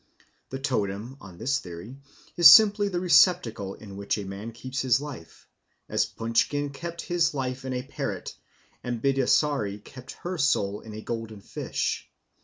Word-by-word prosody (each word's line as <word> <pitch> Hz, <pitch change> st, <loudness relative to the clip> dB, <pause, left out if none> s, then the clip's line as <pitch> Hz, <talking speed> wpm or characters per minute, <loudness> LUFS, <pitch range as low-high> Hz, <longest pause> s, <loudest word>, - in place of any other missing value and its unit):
The 135 Hz, -, -4 dB
totem, 115 Hz, -3 st, -2 dB
on 95 Hz, -3 st, -12 dB
this 135 Hz, +8 st, 0 dB
theory, 90 Hz, +8 st, -9 dB, 0.4 s
is 170 Hz, -4 st, +10 dB
simply 205 Hz, +4 st, +7 dB
the 180 Hz, -3 st, -2 dB
receptacle 170 Hz, -, +3 dB
in 100 Hz, -3 st, -11 dB
which 100 Hz, +2 st, -1 dB
a 105 Hz, -, -5 dB
man 100 Hz, +4 st, -7 dB
keeps 130 Hz, +3 st, -5 dB
his 130 Hz, -1 st, +3 dB
life, 140 Hz, -, -10 dB, 0.4 s
as -, -, +1 dB
Punchkin 130 Hz, +6 st, 0 dB
kept 170 Hz, +4 st, -6 dB
his 175 Hz, -3 st, +1 dB
life 130 Hz, 0 st, -3 dB
in 130 Hz, -, -3 dB
a 125 Hz, 0 st, -3 dB
parrot, 135 Hz, -, -5 dB, 0.5 s
and 120 Hz, -1 st, -3 dB
Bidasari 135 Hz, -4 st, +1 dB
kept 130 Hz, +3 st, -11 dB
her 180 Hz, 0 st, -4 dB
soul 105 Hz, -7 st, +1 dB
in 110 Hz, -1 st, -10 dB
a 110 Hz, -, -6 dB
golden 115 Hz, -3 st, -5 dB
fish. -, -, -3 dB
130 Hz, 160 wpm, -26 LUFS, 105-145 Hz, 0.5 s, is